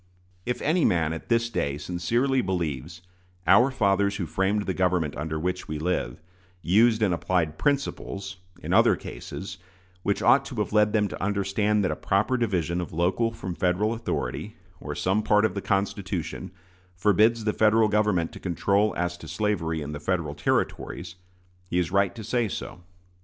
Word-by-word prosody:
If 125 0 -2
any 160 +3 +2
man 80 -3 +2
at 80 - -8
this 115 0 +2
day 70 -7 -1
sincerely 115 - 0
believes 85 - -3 0.4
"our 120 +10 +6
fathers 100 -5 +1
who 95 -3 -2
framed 95 +6 0
the 95 - -1
government 90 -5 0
under 80 +1 -3
which 90 +3 -3
we 75 - -3
live" 80 -6 -2 0.4
used 110 +4 +4
and 95 -4 +2
applied 85 -2 -1
principles, 100 -9 -2 0.3
in - - -2
other - - +5
cases, 95 +10 -8 0.4
which - - -1
ought - - +5
to - - -7
have - - -2
led 105 0 +4
them 105 -2 +2
to - - -6
understand 100 +1 +1
that 90 - +1
a - - -2
proper 95 +10 +1
division 90 -8 0
of 85 - -6
local 90 +8 +1
from 95 -5 -6
Federal 95 +5 +1
authority, 115 0 -4 0.2
or - - -6
some 95 +3 +1
part 105 0 +3
of 110 - 0
the 100 - -3
Constitution, 95 -3 -2 0.5
forbids 105 +5 +3
the 105 0 0
Federal 110 0 +4
Government 105 -5 +1
to - - -10
control 100 +4 +1
as 85 0 -1
to 80 - -11
slavery 80 -2 -1
in 75 - -6
the 75 - -5
Federal 80 -2 -1
Territories, 85 +4 -2 0.5
he 90 - -2
is 90 0 0
right 100 +1 +2
to 110 - -7
say 120 +2 0
so. 90 -2 -6
95 Hz, 175 wpm, -26 LUFS, 85-105 Hz, 0.5 s, our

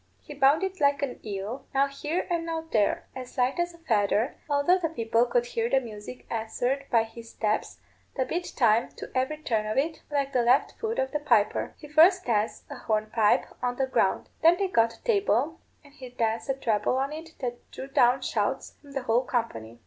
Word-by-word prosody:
He 295 - -11
bounded 300 +7 +2
like 280 0 +3
an 265 -3 -3
eel, 210 +6 -5
now 275 +1 +5
here 295 +5 -3
and 340 -1 0
now 325 -1 -3
there, 210 -3 +1
as 255 +1 -8
light 255 +5 +1
as 345 0 -1
a - - -16
feather, 225 -5 +1
although 290 +6 +3
the 330 -3 -1
people 230 -4 +1
could 240 0 +1
hear 235 -1 -2
the 270 - +4
music 225 0 -9
answered 245 +5 -2
by 230 -2 +4
his 225 +1 -11
steps, 215 -1 -2 0.4
that 260 -2 0
beat 350 +1 -3
time 230 -1 +3
to - - -9
every 260 +4 0
turn 225 -8 -1
of 215 - -2
it, 315 +4 0
like 280 -2 -1
the 250 - +3
left 245 +4 +3
foot 450 0 -2
of 265 0 0
the 300 - -1
piper. 235 -8 +1
He 300 - -11
first 335 +5 +5
danced 220 -2 0
a - - -6
hornpipe 215 0 +2 0.2
on 245 0 -1
the 265 - +1
ground. 260 - +1
Then 335 +2 +6
they 390 0 0
got 230 -7 +2
a - - -25
table, 330 - +1 0.2
and 285 -1 -18
he 260 -3 -10
danced 230 -1 -2
a 270 - +1
treble 225 -2 0
on 275 +2 -1
it 320 +1 -9
that 245 -2 -5
drew - - -7
down 250 -1 +3
shouts - - -2
from 285 -2 -14
the 270 -2 -3
whole 240 +1 +2
company. 120 - -3
260 Hz, 210 wpm, -27 LUFS, 230-300 Hz, 0.4 s, Then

